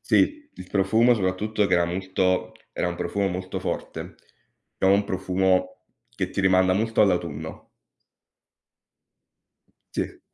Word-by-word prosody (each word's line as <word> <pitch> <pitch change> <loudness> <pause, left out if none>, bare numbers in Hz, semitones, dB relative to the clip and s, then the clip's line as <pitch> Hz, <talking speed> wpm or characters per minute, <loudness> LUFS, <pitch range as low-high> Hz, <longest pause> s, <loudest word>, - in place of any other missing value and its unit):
Sì, 300 -1 +1
il 90 - -10
profumo 110 +5 +4
soprattutto 105 +2 0
che 90 - +2
era 85 0 +3
molto 95 +1 -1 0.2
era 90 - -1
un 85 - -3
profumo 100 +3 -1
molto 95 +1 -4
forte, - - -5 0.6
è - - -1
un 100 +1 +4
profumo 95 -1 0 0.3
che - - -2
ti - - -2
rimanda 95 -1 +4
molto 110 +4 +1
all'autunno. 85 -5 -1 2.3
Sì. - - -3
95 Hz, 120 wpm, -25 LUFS, 90-100 Hz, 2.3 s, profumo